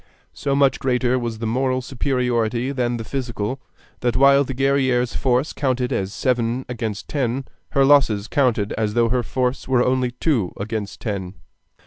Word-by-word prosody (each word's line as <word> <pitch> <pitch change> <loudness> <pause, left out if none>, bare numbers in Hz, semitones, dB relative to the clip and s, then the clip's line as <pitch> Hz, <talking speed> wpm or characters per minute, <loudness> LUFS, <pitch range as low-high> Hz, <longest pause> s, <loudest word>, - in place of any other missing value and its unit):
So 140 -1 -1
much 140 -2 +3
greater 125 -1 +1
was 115 -2 -4
the 115 - -4
moral 130 +3 0
superiority 125 -2 -1
than 120 -3 -1
the 115 - -5
physical, 125 0 -4 0.4
that 120 -1 0
while 140 +1 +6
the 135 -1 -5
Guerrière's 130 -3 +1
force 130 +3 +1
counted 130 -3 -1
as 95 0 -2
seven 120 +1 0
against 110 -4 -4
ten, 130 -2 -1 0.3
her 135 -1 +4
losses 125 -8 +4
counted 120 -7 +1
as 105 -1 -1
though 115 -1 +3
her 125 +1 +1
force 125 +1 -2
were 130 -2 +3
only 130 -1 +1
two 125 - 0
against 105 0 -5
ten. 100 -3 -4
125 Hz, 160 wpm, -22 LUFS, 115-130 Hz, 0.4 s, while